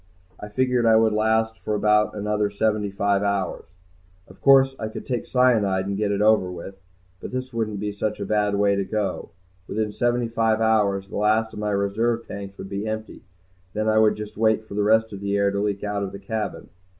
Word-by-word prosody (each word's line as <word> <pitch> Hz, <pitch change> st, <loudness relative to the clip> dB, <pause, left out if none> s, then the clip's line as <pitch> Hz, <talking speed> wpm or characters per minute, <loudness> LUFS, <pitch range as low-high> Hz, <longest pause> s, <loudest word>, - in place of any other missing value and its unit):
I 105 Hz, -, -7 dB
figured 125 Hz, +1 st, +1 dB
I 110 Hz, -, +6 dB
would 110 Hz, -1 st, +4 dB
last 110 Hz, +1 st, +1 dB
for 105 Hz, -, -2 dB
about 105 Hz, +1 st, +2 dB
another 105 Hz, 0 st, 0 dB
seventy 105 Hz, 0 st, 0 dB
five 100 Hz, 0 st, 0 dB
hours. 100 Hz, -2 st, -1 dB, 0.6 s
Of -, -, -17 dB
course 135 Hz, -1 st, +5 dB
I 110 Hz, -, -3 dB
could 110 Hz, -, -8 dB
take 125 Hz, -3 st, -3 dB
cyanide 110 Hz, -7 st, +2 dB
and 100 Hz, 0 st, -2 dB
get 105 Hz, 0 st, 0 dB
it 100 Hz, +1 st, +1 dB
over 105 Hz, -4 st, +3 dB
with. 90 Hz, +2 st, -8 dB, 0.5 s
But -, -, -7 dB
this 130 Hz, 0 st, -5 dB
wouldn't 110 Hz, -3 st, -2 dB
be 105 Hz, 0 st, -2 dB
such 105 Hz, +1 st, -3 dB
a 100 Hz, -, -3 dB
bad 105 Hz, -1 st, +1 dB
way 100 Hz, 0 st, +2 dB
to 100 Hz, -, 0 dB
go. 105 Hz, 0 st, -3 dB, 0.4 s
Within 110 Hz, 0 st, -2 dB
seventy 120 Hz, +1 st, 0 dB
five 115 Hz, -1 st, +1 dB
hours 105 Hz, -3 st, +2 dB
the -, -, -6 dB
last 110 Hz, +2 st, +1 dB
of -, -, -7 dB
my 105 Hz, 0 st, -1 dB
reserve 110 Hz, +4 st, 0 dB
tanks 100 Hz, -1 st, -8 dB
would -, -, -7 dB
be 100 Hz, +2 st, -4 dB
empty. 110 Hz, 0 st, -5 dB, 0.5 s
Then 110 Hz, +1 st, -1 dB
I 110 Hz, 0 st, +4 dB
would 110 Hz, -1 st, +4 dB
just 105 Hz, 0 st, -8 dB
wait 110 Hz, 0 st, +2 dB
for -, -, -9 dB
the 105 Hz, -, 0 dB
rest 110 Hz, +1 st, +3 dB
of 100 Hz, -, -6 dB
the 100 Hz, 0 st, -1 dB
air 100 Hz, 0 st, +2 dB
to 100 Hz, -, -2 dB
leak 100 Hz, -1 st, -2 dB
out 105 Hz, -1 st, -2 dB
of 100 Hz, -1 st, -4 dB
the -, -, -6 dB
cabin. 105 Hz, +1 st, -4 dB
105 Hz, 220 wpm, -23 LUFS, 100-110 Hz, 0.6 s, I